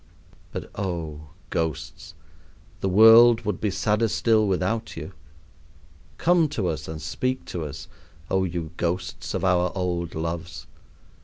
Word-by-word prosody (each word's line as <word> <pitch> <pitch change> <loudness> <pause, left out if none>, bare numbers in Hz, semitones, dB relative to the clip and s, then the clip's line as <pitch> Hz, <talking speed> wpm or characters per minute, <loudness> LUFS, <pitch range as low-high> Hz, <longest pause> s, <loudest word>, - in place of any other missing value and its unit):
But, - - -6
oh, 80 -6 -5 0.2
ghosts, 80 -3 -4 0.6
the 95 - -1
world 115 +4 +8
would 105 -5 -3
be 105 - +1
sadder 105 +3 +1
still 110 0 +2
without 100 +4 -1
you. 80 +3 -7 1.0
Come 170 -2 +3
to 100 -10 -1
us 75 -2 -4
and 80 0 -6
speak 130 +11 -2
to 85 -3 -3
us, 75 - -8 0.4
oh 95 0 +1
you 85 -3 -4
ghosts 90 0 -3
of 95 - -1
our 90 -1 +2
old 85 -2 -2
loves! 85 0 -4
90 Hz, 135 wpm, -25 LUFS, 85-110 Hz, 1.0 s, world